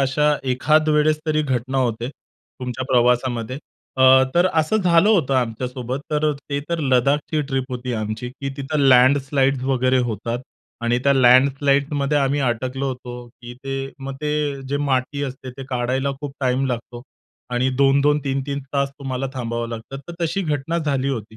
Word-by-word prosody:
अशा 150 +2 +2 0.2
एखादवेळेस 155 +3 +3
तरी 155 0 +1
घटना 130 -1 -1
होते 120 -1 -1
तुमच्या 130 -2 -9
प्रवासामध्ये. 125 0 +1 0.4
अ, 130 - +2 0.3
तर 175 +2 +4
असं 160 +7 +2
झालं 180 0 +4
होतं 160 -11 +3
आमच्यासोबत. 125 +2 -2
तर 150 0 +1
अ, - - 0 0.2
ते 140 0 -1
तर 170 -1 -1
लद्दाखची 140 +3 +1
ट्रिप 135 -1 -1
होती 125 0 -4
आमची, 110 +3 -4
की 135 +2 -6
तिथं 145 +2 -3
लँडस्लाइड्स 135 +1 +4
वगैरे 130 -1 +2
होतात. 115 +3 -3 0.4
आणि 120 +1 +1
त्या 140 - +5
लँडस्लाइडमध्ये 140 +3 +3
आम्ही 140 +1 +1
अटकलो 130 +2 -1
होतो. 125 -1 -7
की 120 0 -12
ते 135 0 -4
मग 135 0 -6
ते 150 -2 -1
जे 145 - 0
माती 140 0 -1
असते, 135 -1 -6
ते 130 +1 -9
काढायला 130 +2 -1
खूप 145 -2 -5
टाईम 130 +1 +1
लागतो. 120 -1 -5 0.5
आणि 125 +2 +1
2-2, 140 +2 +4
3-3 135 +1 -2
तास 140 -1 +1
तुम्हाला 135 -1 -3
थांबावं 115 -2 -3
लागतं, 115 +4 -7
तर - - -6
तशी 195 +4 -1
घटना 155 +1 -1
झाली 140 -4 -1
होती. 110 -4 -5
135 Hz, 155 wpm, -21 LUFS, 125-145 Hz, 0.5 s, त्या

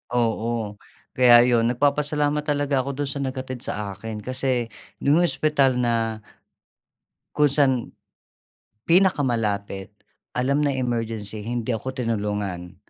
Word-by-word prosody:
Oo. 115 -2 -1 0.4
kaya 120 -1 +8
'yon. 120 -2 +3
Nagpapasalamat 145 +3 +1
talaga 145 -2 +1
ako 135 +1 -3
dun 140 - -3
sa 140 - -4
naghatid 130 -1 -4
sa 105 -1 -4
akin. 110 +2 -7
Kasi 130 -2 -1 0.3
yung 145 +4 +4
ospital 150 -5 +2
na 115 -2 0 1.1
kung 150 -2 +4
saan 135 -4 +2 1.0
pinakamalapit, 115 - +1 0.5
alam 140 +3 +1
na 145 - +2
emergency, 115 -4 -3
hindi 120 +1 -2
ako 120 +4 -4
tinulungan. 105 -7 -3
125 Hz, 110 wpm, -24 LUFS, 110-140 Hz, 1.1 s, kaya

